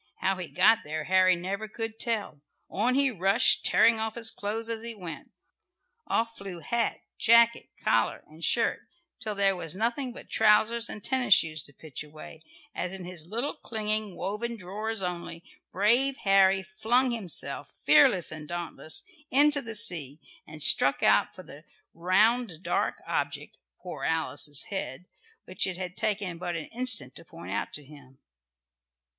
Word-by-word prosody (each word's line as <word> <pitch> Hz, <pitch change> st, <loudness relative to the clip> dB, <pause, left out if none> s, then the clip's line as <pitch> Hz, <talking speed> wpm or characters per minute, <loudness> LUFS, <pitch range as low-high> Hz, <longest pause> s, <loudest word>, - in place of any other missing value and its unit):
How 190 Hz, +1 st, 0 dB
he 180 Hz, -2 st, -6 dB
got 205 Hz, +7 st, +4 dB
there 155 Hz, +1 st, -5 dB
Harry 185 Hz, +1 st, +3 dB
never 195 Hz, +5 st, -5 dB
could 225 Hz, 0 st, -6 dB
tell. 215 Hz, -11 st, -1 dB, 0.3 s
On 240 Hz, +6 st, 0 dB
he 275 Hz, -1 st, +2 dB
rushed, 195 Hz, -2 st, +3 dB
tearing 225 Hz, 0 st, +4 dB
off 220 Hz, 0 st, -3 dB
his 230 Hz, -1 st, 0 dB
clothes 220 Hz, +3 st, -3 dB
as 230 Hz, -1 st, -4 dB
he 230 Hz, 0 st, -5 dB
went. 175 Hz, -5 st, -6 dB, 0.8 s
Off 230 Hz, 0 st, -1 dB
flew 190 Hz, -4 st, -8 dB
hat, 235 Hz, +4 st, -1 dB, 0.2 s
jacket, 235 Hz, 0 st, +5 dB
collar 115 Hz, 0 st, +1 dB
and 155 Hz, +2 st, -14 dB
shirt, 230 Hz, +5 st, +1 dB, 0.4 s
till 215 Hz, -3 st, -4 dB
there 195 Hz, -1 st, +2 dB
was 170 Hz, -1 st, -5 dB
nothing 240 Hz, +5 st, -2 dB
but 240 Hz, -, -11 dB
trousers 220 Hz, +2 st, +3 dB
and 210 Hz, -, -8 dB
tennis 255 Hz, -7 st, +4 dB
shoes 155 Hz, -2 st, 0 dB
to 140 Hz, -, -13 dB
pitch 155 Hz, +1 st, -8 dB
away, 155 Hz, +1 st, -13 dB, 0.3 s
as 180 Hz, +1 st, -4 dB
in 185 Hz, -2 st, -8 dB
his 175 Hz, -3 st, -6 dB
little 235 Hz, +9 st, -3 dB
clinging 215 Hz, -, -2 dB
woven 215 Hz, +5 st, -4 dB
drawers 210 Hz, +2 st, -4 dB
only, 170 Hz, -1 st, -5 dB, 0.3 s
brave 240 Hz, +8 st, +3 dB
Harry 195 Hz, -1 st, +4 dB
flung 225 Hz, +5 st, 0 dB
himself, 170 Hz, -10 st, -2 dB, 0.2 s
fearless 150 Hz, +4 st, +5 dB
and 155 Hz, -1 st, -8 dB
dauntless, 170 Hz, -2 st, -2 dB, 0.3 s
into 290 Hz, +2 st, +4 dB
the 225 Hz, -2 st, -6 dB
sea, 165 Hz, -, +3 dB, 0.3 s
and 155 Hz, -1 st, -4 dB
struck 135 Hz, 0 st, +5 dB
out -, -, +3 dB
for 185 Hz, -, -10 dB
the 150 Hz, -2 st, -14 dB, 0.3 s
round 185 Hz, +2 st, +1 dB
dark -, -, -1 dB
object, -, -, -3 dB, 0.2 s
poor -, -, -8 dB
Alice's 155 Hz, -3 st, +1 dB
head, 180 Hz, -5 st, -5 dB, 0.4 s
which 185 Hz, +1 st, -1 dB
it 185 Hz, -2 st, -5 dB
had 180 Hz, 0 st, -6 dB
taken 200 Hz, -5 st, -2 dB
but 175 Hz, -1 st, -4 dB
an 165 Hz, -, -6 dB
instant 250 Hz, 0 st, +2 dB
to -, -, -6 dB
point -, -, -11 dB
out -, -, -2 dB
to 150 Hz, -, -5 dB
him. 140 Hz, -2 st, -15 dB
195 Hz, 160 wpm, -27 LUFS, 170-225 Hz, 0.8 s, jacket